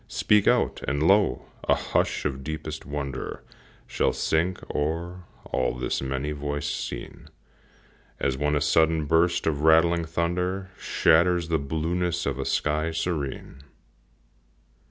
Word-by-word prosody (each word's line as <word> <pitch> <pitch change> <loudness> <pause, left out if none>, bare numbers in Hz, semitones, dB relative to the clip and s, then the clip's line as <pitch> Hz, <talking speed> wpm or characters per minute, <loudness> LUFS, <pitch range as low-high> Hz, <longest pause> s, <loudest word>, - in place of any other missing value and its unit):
Speak 105 -2 +2
out! - - +2
and, 70 +1 0
lo! 100 +4 +3 0.3
a - - +6
hush - - -1
of 65 -2 -2
deepest 80 +1 -6
wonder 70 -2 -5 0.4
Shall - - 0
sink 85 +3 0 0.2
o'er 85 +4 -3 0.2
all 65 -1 -1
this 60 - -2
many 70 +2 -2
voicèd 75 0 -3 0.2
scene, - - -8 0.9
As 65 - 0
when 75 +2 0
a 75 - +1
sudden 80 -1 +3
burst 85 +3 +2
of 75 -3 0
rattling 80 +2 +4
thunder 90 +3 -2
Shatters 85 +1 +3
the 80 -1 +2
blueness 85 +4 -1
of 70 -1 -2
a 65 - -2
sky 75 +1 0
serene. 80 -5 -4
80 Hz, 130 wpm, -26 LUFS, 75-85 Hz, 0.9 s, a